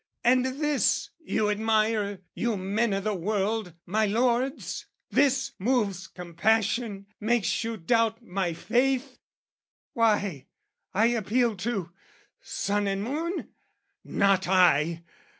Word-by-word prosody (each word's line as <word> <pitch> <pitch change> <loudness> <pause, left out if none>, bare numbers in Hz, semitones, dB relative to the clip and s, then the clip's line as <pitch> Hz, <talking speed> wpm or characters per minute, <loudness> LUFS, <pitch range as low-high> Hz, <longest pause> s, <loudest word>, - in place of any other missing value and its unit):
And 250 +1 +4
this 285 +2 0
you 220 -10 0
admire, 215 -2 +1
you 235 -3 -1
men 205 +4 0
o' 195 - +1
the 215 +1 -1
world, 200 0 -1
my 215 +4 +1
lords? 245 +5 0 0.2
This 275 -1 +2
moves 200 -4 0
compassion, 200 +4 0
makes 235 +1 +1
you 225 0 -3
doubt 225 +4 +1
my 185 -4 -2
faith? 255 - 0 0.7
Why, 205 - +1 0.4
I 210 +4 +3
appeal 235 0 +1
to...sun 200 - -4
and 195 0 -1
moon? 320 - -3 0.5
Not 195 -2 +2
I! 170 -3 +3
215 Hz, 105 wpm, -27 LUFS, 195-240 Hz, 0.7 s, And